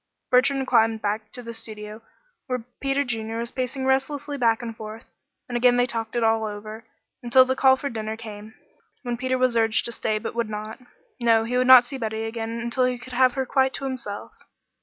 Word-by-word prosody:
Bertrand 270 +1 +3
climbed 225 -3 +2
back 215 +1 -2
to 245 - -7
the 230 0 -7
studio 215 -1 -7 0.5
where 250 -3 -3 0.2
Peter 275 +1 +1
Junior 225 -3 -3
was 235 +1 -4
pacing 260 +1 -3
restlessly 285 +2 0
back 235 -3 +2
and 230 -1 -5
forth, 220 +1 -9 0.4
and 245 - -5
again 245 0 +4
they 245 - +4
talked 230 -1 -3
it 240 - +1
all 225 0 +2
over, 215 +2 -7 0.3
until 250 +2 +5
the 260 0 0
call 265 0 +5
came - - -15
for 280 - -2
dinner, 220 -1 -4 0.9
when 245 -1 -2
Peter 255 +2 -1
was 255 -2 +2
urged 225 -1 +2
to 235 - -4
stay, 220 -2 -1
but 215 - -5
would 235 -1 -2
not. 215 +2 -6 0.4
No, 230 -2 +4
he 235 +2 -3
would 250 0 +2
not 255 -1 +9
see 270 +1 -7
Betty 220 -1 -3
again 225 0 -4
until 240 +2 +1
he 250 0 0
could 250 +1 -11
have 255 0 +4
her 265 0 -1
quite 265 +1 +1
to - - -6
himself. 255 -7 -5
235 Hz, 210 wpm, -24 LUFS, 225-255 Hz, 0.9 s, not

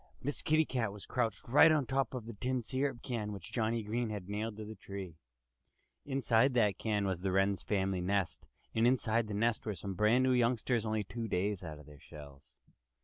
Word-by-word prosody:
Miss 145 +2 -2
Kitty 155 +1 +3
Cat 120 -7 -1
was 100 0 -10
crouched 115 -6 -2
right 145 +6 +7
on 150 -3 +2
top 135 -1 -1
of 120 -4 -5
the 115 - -7
tin 125 +4 -2
syrup 130 +1 -2
can 110 -5 -3
which 100 -4 -8
Johnnie 115 -1 0
Green 115 +2 -1
had 105 -4 -5
nailed 105 +1 -3
to 110 - -6
the 110 - -7
tree. 95 -5 -8 0.9
Inside 130 -2 +2
that 105 -5 +3
can 105 -2 0
was 95 -3 -2
the 95 0 0
Wren 95 +1 +3
family's 95 -2 -1
nest. 100 -2 -1 0.3
And 115 +1 +3
inside 115 -3 +2
the 105 - -4
nest 115 +2 +1
were 105 -2 -3
some 95 +3 -5
brand 105 +6 +3
new 130 0 +3
youngsters, 120 -1 +1
only 110 -1 0
two 115 +3 -5
days 100 0 -1
out 80 -3 -6
of 75 - -13
their 75 -2 -14
shells. 70 -1 -13
110 Hz, 205 wpm, -33 LUFS, 100-120 Hz, 0.9 s, right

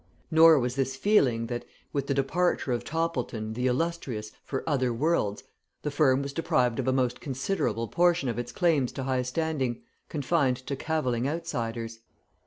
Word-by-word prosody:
Nor 160 0 +8
was 125 -1 0
this 135 -1 -1
feeling, 130 - +3
that 120 0 -4 0.3
with 140 -1 -1
the 140 - 0
departure 140 +1 +1
of 120 - -1
Toppleton, 130 -9 -2
the 125 +3 0
illustrious, 130 -6 -2
for 135 - -4
other 130 -5 +1
worlds 115 -5 0 0.4
the 150 - -1
firm 140 -2 +3
was 140 0 -5
deprived 130 -8 +1
of 130 - -1
a - - +4
most 125 -2 0
considerable 125 - -1
portion 175 0 +2
of 120 0 -2
its 120 0 -4
claims 155 -8 +2
to 135 - -4
high 130 -1 0
standing, 130 -2 -2 0.3
confined 145 -3 +1
to 140 - -2
cavilling 135 -5 -1
outsiders. 115 -7 -4
135 Hz, 165 wpm, -28 LUFS, 120-160 Hz, 0.4 s, Nor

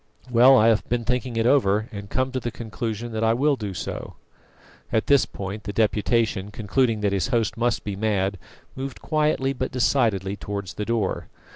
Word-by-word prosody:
Well, 125 +3 +7
I 110 0 +5
have 110 -2 +1
been 120 -1 -1
thinking 125 0 -1
it 115 0 +1
over, 110 -5 +3
and 100 -2 -8
come 130 +3 0
to 130 - -2
the 120 - -3
conclusion 115 0 -5
that 110 0 -2
I 115 0 +3
will 145 +3 +2
do 105 -6 -5
so 85 - -5 0.4
" - - -32 0.3
At 110 - +1
this 140 -2 +4
point 100 +2 -6
the 105 - -3
Deputation, 110 -2 +1
concluding 110 +2 0
that 100 -1 +1
his 100 +2 0
host 115 -5 0
must 120 0 0
be 100 -2 -4
mad, 100 -2 0 0.4
moved 135 0 -6
quietly 150 -3 +1
but 130 0 -3
decidedly 110 -6 +1
towards 100 -3 -5
the 105 +3 -4
door. 115 -4 -1
115 Hz, 190 wpm, -24 LUFS, 105-125 Hz, 0.4 s, Well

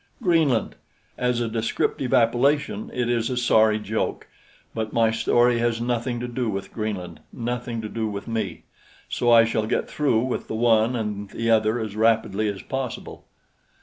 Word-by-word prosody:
Greenland! 160 - +2 0.4
As 125 -1 0
a 120 - 0
descriptive 115 +3 -1
appellation, 125 0 +2
it 125 -1 -1
is 120 0 0
a 125 - -2
sorry 110 -3 +4
joke 110 +1 -3 0.5
but 110 -1 -3
my 115 -1 +3
story 120 +1 +3
has 115 -1 0
nothing 120 0 -1
to 125 - -4
do 120 -1 -2
with 100 -1 -5
Greenland, 95 -7 -4
nothing 120 -1 -4
to - - -3
do 110 0 -3
with 100 -1 -6
me; 115 -1 -3 0.4
so 120 - 0
I 115 -1 +7
shall 110 -1 -1
get - - 0
through 140 -7 +1
with 130 -1 -3
the - - -4
one 115 +1 +3
and 105 -3 -3
the 115 +2 -1
other 110 +1 +3
as 110 -2 -5
rapidly 110 -1 +2
as 100 -2 -4
possible. 135 -3 -5
115 Hz, 170 wpm, -24 LUFS, 110-120 Hz, 0.5 s, I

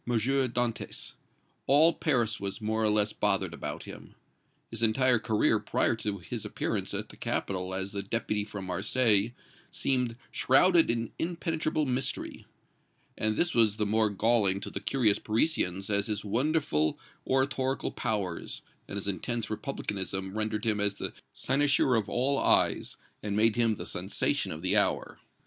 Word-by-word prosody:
Dantès; 120 0 -1 0.5
all 155 +5 +7
Paris 120 -7 0
was 100 +1 -4
more 110 0 -1
or 110 - +3
less 105 0 +2
bothered - - 0
about - - -5
him; - - -11 0.6
his 115 0 -5
entire 120 +2 +3
career 110 -1 +2
prior - - +1
to 105 -2 -3
his 85 - -6
appearance - - -3
at - - -4
the - - -12
capital 95 -1 -2
as 95 +1 -3
the 100 0 -3
Deputy 105 0 -1
from 105 -2 -7
Marseilles 105 +3 +2 0.4
seemed 125 -3 -1 0.2
shrouded 165 +6 +4
in 115 -1 -1
impenetrable 165 -2 -1
mystery, 130 0 -2 0.7
and 110 0 0
this 175 0 +1
was 110 -3 +4
the 105 - 0
more 110 +1 +2
galling 100 -2 +2
to - - -6
the - - -4
curious 115 -7 +1
Parisians 105 - 0
as 100 0 +2
his 105 -1 -3
wonderful 120 - +1 0.3
oratorical 130 0 0
powers 100 -6 -3 0.2
and - - -7
his 100 0 -3
intense 110 +4 -2
republicanism 95 -6 -3
rendered 110 0 -2
him 110 -2 +2
the 100 -1 -1 0.2
cynosure 140 -2 +2
of 110 -3 0
all 135 +3 +1
eyes - - +2 0.2
and 105 -1 -3
made 110 0 +4
him 115 -2 +2
the - - -7
sensation - - -1
of 80 +2 -7
the 95 +2 +3
hour. 105 - 0
110 Hz, 150 wpm, -29 LUFS, 100-130 Hz, 0.7 s, all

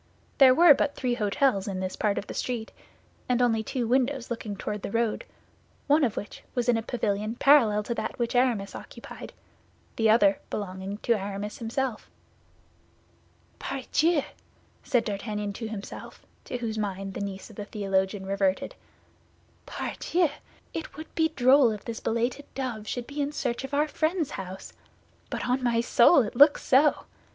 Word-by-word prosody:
There 260 -2 +8
were 335 -1 +8
but 285 +1 -1
three 245 -2 -1
hôtels 210 -1 +1
in 190 -2 -3
this 185 0 -3
part 205 -2 0
of - - -3
the - - -7
street; 235 -3 -3 0.6
and 250 -1 +2
only 230 -3 +2
two 240 +3 -3
windows 255 +1 0
looking 220 -3 -4
toward 210 +1 -4
the - - -4
road, 230 +1 -1 0.6
one 295 +1 +4
of 235 -6 0
which 205 - -6
was 245 -1 0
in 245 - +4
a 225 - 0
pavilion 215 -2 -2
parallel 235 -7 +5
to 235 - -3
that - - -4
which 235 -1 -1
Aramis 245 -6 +1
occupied, - - -10 0.7
the 225 -1 +3
other 205 -3 +5
belonging 190 0 -5
to 235 - +3
Aramis 205 0 -4
himself. 235 0 -3 1.5
"Pardieu!" 290 +4 +1 0.6
said 245 -2 +2
D'Artagnan 210 0 -3
to 225 +2 -5
himself, 215 -2 -8 0.2
to 250 - -4
whose 225 -2 -3
mind 195 -1 -3
the - - -5
niece 200 +2 -6
of - - -15
the 205 - -6
theologian 195 -1 -1
reverted, 195 -1 0 0.9
"pardieu, 345 -2 -1 0.4
it 320 -3 -6
would 315 - -9
be 320 -1 +2
droll 260 0 +6
if 210 -2 -5
this 230 -1 -5
belated 240 +5 -1
dove 240 -5 -4
should 245 -1 -3
be 290 +2 -4
in 285 +1 -1
search 250 -4 -2
of 270 - -6
our 295 +2 +2
friend's 315 0 -1
house. 190 0 -7 0.6
But - - -3
on 250 +1 +1
my 235 -2 +1
soul, 245 +4 +5
it 210 - -6
looks 285 +4 +6
so. 285 +3 +3
235 Hz, 165 wpm, -27 LUFS, 205-265 Hz, 1.5 s, There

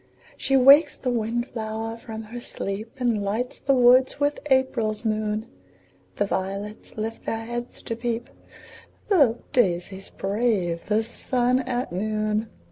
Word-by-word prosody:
She 270 - +2
wakes 280 +4 +7
the 250 - -2
wind 235 +1 -1
flower 225 0 -4
from 225 -1 -8
her 230 +3 -8
sleep, 215 -1 -5
And 235 -4 +1
lights 220 +5 -2
the 275 - +2
woods 255 +2 +5
with 290 0 +1
April's 240 -5 +1
moon; 215 0 -1 0.7
The 205 - +1
violets 200 +3 -4
lift 225 +1 -4
their 225 0 -3
heads 240 +1 -5
to 230 - -3
peep, 235 0 -3 0.8
The 280 - +4 0.2
daisies 190 -3 0
brave 195 -5 -1
the 215 +1 +2
sun 245 +2 0
at 250 -4 -2
noon. 215 +3 -1
225 Hz, 135 wpm, -25 LUFS, 215-245 Hz, 0.8 s, wakes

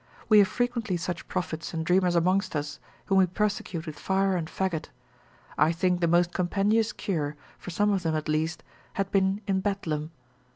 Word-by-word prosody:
We 215 -1 +8
have 200 - +6
frequently 235 -6 -1
such 175 0 -4
prophets 165 -3 -4
and 160 0 -2
dreamers 180 0 +3
amongst 185 +2 +2
us, 145 -1 -3 0.3
whom 195 -1 +3
we 185 - +5
persecute 185 -3 -2
with 155 -2 -7
fire 195 0 +1
and 165 -3 -2
faggot: 180 -2 -2 0.7
I 155 +2 +5
think 180 +1 +1
the 170 - +3
most 175 +1 +3
compendious 205 +5 +1
cure, 155 -9 -2 0.2
for - - -8
some 205 +4 +2
of 195 -2 +1
them 165 -2 0
at 155 0 -2
least, 155 +2 -1 0.3
had 195 -1 -2
been 195 +1 +2
in 195 -2 +1
Bedlam. 165 -7 -2
180 Hz, 180 wpm, -27 LUFS, 165-195 Hz, 0.7 s, We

